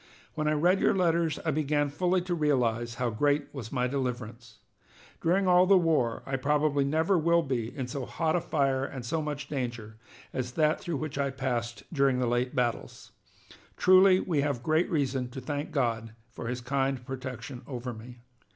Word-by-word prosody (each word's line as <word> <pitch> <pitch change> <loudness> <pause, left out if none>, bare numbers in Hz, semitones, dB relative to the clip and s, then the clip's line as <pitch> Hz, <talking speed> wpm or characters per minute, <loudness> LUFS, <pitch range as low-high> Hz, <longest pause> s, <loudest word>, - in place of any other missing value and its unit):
When 155 -1 -2
I 155 - +3
read 175 +6 +3
your - - +3
letters 170 -3 +1
I 160 - +2
began 145 -1 0
fully 180 +4 +1
to 180 0 -3
realize 120 -7 0
how 125 -1 -1
great 145 +5 0
was 120 -6 -7
my 125 -2 0
deliverance. 120 -4 -4 0.6
During 185 +3 +2
all 180 0 +5
the 195 0 +7
war 155 -10 +1
I - - -8
most 135 -1 -1
probably 145 0 +2
never 160 +6 +2
will 170 +1 +3
be 120 -5 -2
in 130 - -2
so 125 +1 -5
hot 160 -1 0
a 175 - +1
fire 135 -5 0
and 140 - -5
in 130 - -5
so 155 +7 -1
much 145 -2 -4
danger 120 -6 -4 0.4
as 125 -1 -3
that 155 +1 +2
through 170 -4 -3
which 150 -1 -4
I 140 0 +1
passed 120 -5 -3
during 135 -3 +3
the 125 - +1
late 120 +1 0
battles. 120 -2 -2 0.7
Truly 185 0 +6
we 165 -7 0
have 140 -4 -2
great 160 +4 +2
reason 135 -5 -1
to 130 - -7
thank 145 +3 -4
God 115 -6 -1 0.2
for 115 - -7
his 125 +1 -3
kind 135 0 -1
protection 130 -1 -6
over 125 -2 -5
me. 120 +2 -12
140 Hz, 190 wpm, -28 LUFS, 125-155 Hz, 0.7 s, the